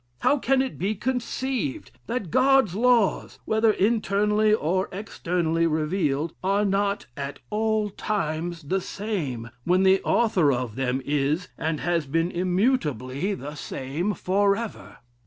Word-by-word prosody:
How 290 - +3
can 265 +1 +2
it 265 - -6
be 205 +4 0
conceived, 250 - -2 0.2
that 205 -10 -3
God's 265 -5 +4
laws, 235 -1 +2
whether 220 +1 +3
internally, 210 0 +2
or 185 -2 +1
externally 170 -4 -1
revealed, 155 -1 0
are 200 +2 +2
not 200 +1 0
at 140 0 -5
all 215 -1 0
times 170 -5 -3
the 185 +7 -1
same, 150 - -4
when 180 +5 +3
the 190 0 +5
author 185 -11 +3
of 120 -4 -2
them 130 0 -1
is, 150 +5 0
and 155 -1 -2
has 170 -2 0
been 165 +5 0
immutably 180 - 0
the 145 -4 -7
same 150 +7 -3
forever?'" 200 - -1
185 Hz, 130 wpm, -25 LUFS, 155-215 Hz, 0.2 s, the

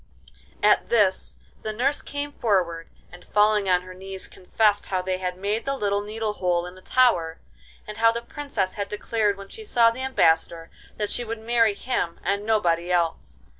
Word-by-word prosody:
At - - +4
this 205 -5 +2 0.2
the 215 - -3
nurse 260 +7 0
came 285 0 -5
forward, 180 -9 0 0.2
and, 180 0 -13
falling 210 -1 +2
on 180 -1 +3
her 185 0 -10
knees, 190 +1 -5
confessed 205 +2 0
how 185 -1 -1
they 185 0 -2
had 180 -1 -3
made 205 +4 -2
the 275 0 0
little 200 -3 0
needle 215 +1 -3
hole 175 -3 0
in 180 - -8
the 185 - -15
tower, 175 -10 +2 0.5
and 210 0 -8
how 230 0 +6
the 235 +1 -5
Princess 275 -9 -3
had 200 -1 -4
declared 210 -1 0
when 195 0 -10
she 445 - -7
saw 235 - +4
the 245 +3 -7
Ambassador 165 -9 +1 0.3
that 210 -1 -2
she 245 - 0
would 230 0 -4
marry 225 -1 +2
him 200 -7 -2
and 200 +3 -1
nobody 175 -5 +1
else. 165 - -1
205 Hz, 185 wpm, -24 LUFS, 180-230 Hz, 0.5 s, how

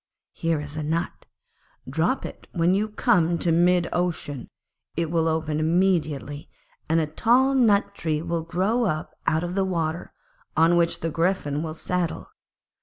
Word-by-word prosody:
Here 165 -2 0
is 145 0 -6
a 155 - -3
nut. 160 +3 -3 0.6
Drop 160 - 0
it - - -9
when 170 0 +2
you 210 +3 +1
come 175 -5 +2
to 170 - +1
mid 175 +1 +3
ocean; 160 -7 -2 0.5
it 165 -1 -1
will 165 -1 +2
open 155 -1 -1
immediately 155 -4 0 0.4
and 165 +1 +3
a 160 - +1
tall 245 - +3
nut 210 -6 +3
tree 160 -5 -2
will 170 -1 -1
grow 195 +9 0
up 155 -5 -2
out 160 +1 +2
of 175 0 -3
the 195 0 +1
water, 170 -3 -2 0.5
on 165 +2 +5
which 170 -1 +1
the 165 - -2
Griffin 165 -3 0
will 160 -1 -4
settle. 180 0 -2
165 Hz, 160 wpm, -25 LUFS, 155-180 Hz, 0.6 s, on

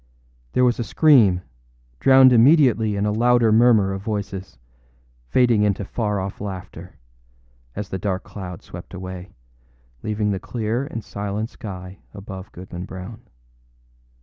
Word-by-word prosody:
There 125 - +3
was 120 -1 +1
a - - 0
scream, 115 - +4 0.6
drowned 130 -1 +7
immediately 120 -4 +4
in 100 +1 -1
a 105 - +1
louder 120 +1 +3
murmur 110 -4 +4
of 95 - -5
voices, 100 - -5 0.7
fading 120 - +3
into 100 -1 0
far 105 -2 -2
off 95 +1 -5
laughter, 95 -3 -8 0.8
as 105 -1 -5
the 95 - -4
dark 95 -1 -2
cloud 95 -1 -8
swept 90 +2 -10
away, 95 +1 -8 0.7
leaving 105 +2 -1
the 95 - -2
clear 115 +5 -3
and 115 -7 -6
silent 105 +3 -4
sky 95 -2 -9 0.2
above 95 -1 -9
Goodman 90 0 -8
Brown. 95 +5 -9
105 Hz, 135 wpm, -22 LUFS, 95-115 Hz, 0.8 s, drowned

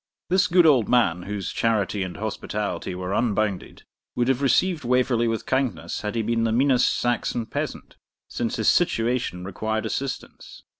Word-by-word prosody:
This 185 0 +4
good 180 -1 +5
old 135 -8 +4
man, 95 -9 +3
whose 100 -4 -3
charity 105 -3 0
and 95 -1 -4
hospitality 105 -4 -4
were 90 +1 -4
unbounded, 105 -4 -1 0.3
would 120 +1 +1
have 135 0 +1
received 165 +4 +2
Waverley 125 -1 +2
with 115 -1 -2
kindness 130 -2 -1
had 105 +1 -4
he 115 - 0
been 115 +1 0
the 115 - +1
meanest 130 +2 +3
Saxon 120 -1 -1
peasant, - - -5 0.3
since 115 -2 -3
his 110 - -1
situation 120 - +1
required 110 +4 -3
assistance. 135 +4 -5
115 Hz, 155 wpm, -24 LUFS, 105-125 Hz, 0.3 s, good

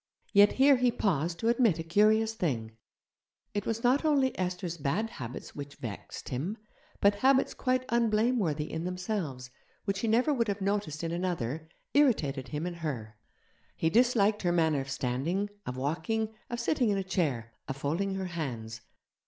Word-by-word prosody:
Yet 205 0 +7
here 275 +1 +6
he 250 -1 +3
paused 170 - 0
to 225 - 0
admit 235 -6 +4
a 165 - -3
curious 215 +6 +3
thing: 120 - -2 0.8
it 205 -1 -2
was 230 +1 -2
not 255 +5 +3
only 280 -4 +2
Esther's 180 -2 -3
bad 190 +11 -1
habits 120 -1 -7
which 145 -1 -7
vexed 110 -5 -7
him, 160 - -3 0.4
but 200 0 +6
habits 265 0 +4
quite 255 0 0
unblameworthy 220 - +2
in 160 +1 -4
themselves 180 - -3 0.3
which 195 -1 -1
he 230 - -1
never 245 +7 +3
would 235 -4 +1
have 200 0 -1
noticed 195 -6 -1
in 165 - -2
another, 160 -4 -2 0.2
irritated 150 - +2
him 150 +6 -3
in 175 - -3
her. 115 -9 -4 0.6
He 160 - +1
disliked 220 -2 +3
her 175 - +1
manner 160 -4 +2
of 135 - -7
standing, 140 +11 -1 0.2
of 125 - -4
walking, 180 +11 -1 0.2
of 240 - -3
sitting 245 0 +1
in 200 - +2
a 195 - -1
chair, 135 -12 -1
of 135 - -4
folding 170 +8 -1
her 190 0 -2
hands. 120 -10 -5
185 Hz, 170 wpm, -30 LUFS, 145-225 Hz, 0.8 s, Yet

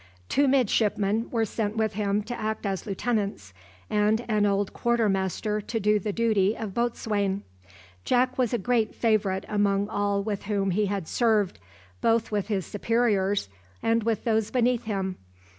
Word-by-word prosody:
Two 280 0 +3
midshipmen 220 -4 +2
were 225 -2 +1
sent 215 0 -3
with 220 -1 +1
him 205 0 0
to 235 +4 -5
act 215 -1 -3
as 195 -2 -2
lieutenants, 200 - -2 0.3
and 210 +3 +1
an 210 -2 +2
old 200 0 0
quarter 235 -2 +1
master 195 +2 -1
to 225 +2 -3
do 210 0 +3
the 210 +2 -2
duty 215 -2 +2
of 215 -4 -5
boatswain. 205 -4 -1 0.6
Jack 255 +1 +2
was 250 -4 +1
a 240 - +1
great 225 0 0
favourite 210 -4 +1
among 205 -1 +1
all 205 -1 0
with 205 -2 -3
whom 195 -2 0
he 205 +3 +1
had 195 -4 -3
served, 220 -5 +1 0.4
both 230 -1 +2
with 205 -2 -1
his 195 -5 -1
superiors 205 - +1 0.4
and 230 0 +2
with 225 -1 -1
those 220 -2 +1
beneath 245 -1 +1
him. 195 -3 -2
210 Hz, 160 wpm, -26 LUFS, 200-230 Hz, 0.6 s, Two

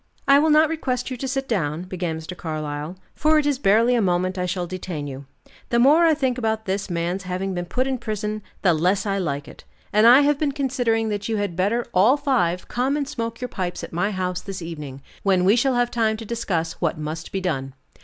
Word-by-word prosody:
"I 280 0 +7
will 315 +2 +3
not 310 +1 +6
request 270 -5 -2
you 255 - -3
to 270 - -4
sit 270 +1 -2
down," 165 -6 -1
began 180 -3 -3
Mr. 160 +3 -7
Carlyle, 155 0 -5 0.2
"for 310 +1 +3
it 300 - +2
is 285 -3 +1
barely 230 +2 +4
a 240 - +3
moment 185 -1 +1
I 180 -1 -2
shall 180 0 -2
detain 175 -4 -5
you. 140 -1 -8 0.4
The 235 - +2
more 295 +8 +6
I 320 - +4
think 260 -4 0
about 220 -1 -1
this 195 +1 -2
man's 175 +2 -2
having 185 +1 -3
been 175 -1 -4
put 255 +9 0
in 265 -2 -2
prison, 215 -2 -3 0.2
the 180 -3 +5
less 185 +5 +1
I 200 -1 0
like 145 -5 -3
it; - - -13 0.3
and 215 +2 +6
I 250 +4 +9
have 290 0 +2
been 290 -3 0
considering 245 -5 0
that 205 +1 -3
you 220 - 0
had 205 -4 -2
better 205 +7 +1
all 215 +10 +5
five, 180 -12 0
come 260 +4 0
and 285 -2 -2
smoke 230 -4 -4
your 250 - -2
pipes 185 -6 -4
at - - -8
my 175 +5 0
house 180 -2 -2
this 195 -3 -6
evening, 150 -5 -7 0.2
when 185 -2 +2
we 200 +4 +5
shall 255 +1 +2
have 245 0 +1
time 220 -2 +1
to 225 - -8
discuss 180 -8 -2
what 170 -3 0
must 155 +2 -5
be 195 - -1
done. 135 -8 -3
200 Hz, 235 wpm, -23 LUFS, 175-245 Hz, 0.4 s, I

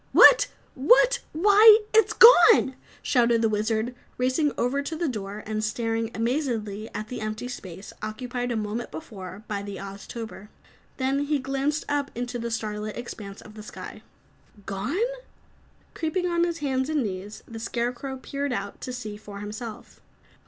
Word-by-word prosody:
"WHAT? - - +8 0.3
WHAT!!! - - +5
Why, 415 +6 +8 0.2
it's 445 0 +5
gone!" 355 - +8 0.3
shouted 235 -2 +3
the 225 - +3
Wizard, 220 +3 0 0.2
racing 260 +4 +1
over 260 +4 0
to 320 +3 -4
the 335 +1 -1
door 210 -4 -5
and 215 0 -2
staring 225 +1 -1
amazedly 225 -4 -2
at 215 +1 -5
the 250 - -5
empty 215 +3 -4
space 195 -6 -8
occupied 245 +2 -4
a - - -1
moment 215 +2 -3
before 185 +5 -9
by 205 -2 -3
the 200 0 -6
Oztober. 200 +2 -8 0.5
Then 275 +2 0
he 295 0 +1
glanced 275 +3 -1
up 285 -1 -1
into 245 +1 -4
the 235 0 -3
starlit 215 -2 -4
expanse 205 -4 -8
of 215 0 -11
sky. - - -9 0.6
"Gone?" 205 - -3 1.0
Creeping 355 +3 -1
on 345 -1 +2
hands 275 -4 -2
and 305 -4 +1
knees, 200 0 -6
the 225 -1 -8
Scarecrow 245 +4 -3
peered 280 +2 -4
out 200 -4 -4
to 255 - -5
see 220 -4 -6
for 210 -1 -10
himself. 215 +2 -8
235 Hz, 150 wpm, -26 LUFS, 215-275 Hz, 1.0 s, WHAT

